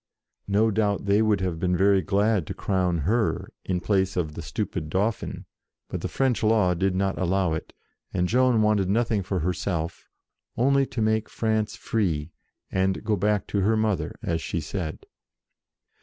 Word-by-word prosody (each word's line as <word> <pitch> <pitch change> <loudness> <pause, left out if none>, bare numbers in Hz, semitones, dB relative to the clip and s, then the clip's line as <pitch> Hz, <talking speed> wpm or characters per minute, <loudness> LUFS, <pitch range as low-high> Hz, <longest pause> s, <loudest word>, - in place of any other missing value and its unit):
No 105 +3 +3
doubt 100 -1 0
they 100 +2 +3
would 105 -3 +2
have 90 -3 -2
been 90 0 +1
very 100 0 +4
glad 100 0 +1
to - - -5
crown 90 -4 0
her, 110 +3 0
in 90 -2 -1
place 95 0 0
of 80 -4 -1
the - - -6
stupid 75 - -4
Dauphin, 100 +5 -1 0.4
but - - -4
the - - -2
French 130 -3 0
law 105 -5 +3
did 95 +2 0
not 95 +1 0
allow 95 -1 +1
it; 80 - -5 0.4
and 90 -1 0
Joan 125 0 +3
wanted 105 -3 +2
nothing 110 0 +1
for 95 -1 -2
herself, 85 -1 -2 0.5
only 135 +2 +3
to 115 - -2
make 110 0 +1
France 110 -1 -1
free, 85 -10 -1 0.4
and 95 0 0
go 110 - +1
back 105 +1 +1
to 100 - -1
her 110 +3 +2
mother, 110 -3 0
as 80 -1 -1
she 85 - -2
said. 80 +1 -5
100 Hz, 170 wpm, -25 LUFS, 90-110 Hz, 0.5 s, very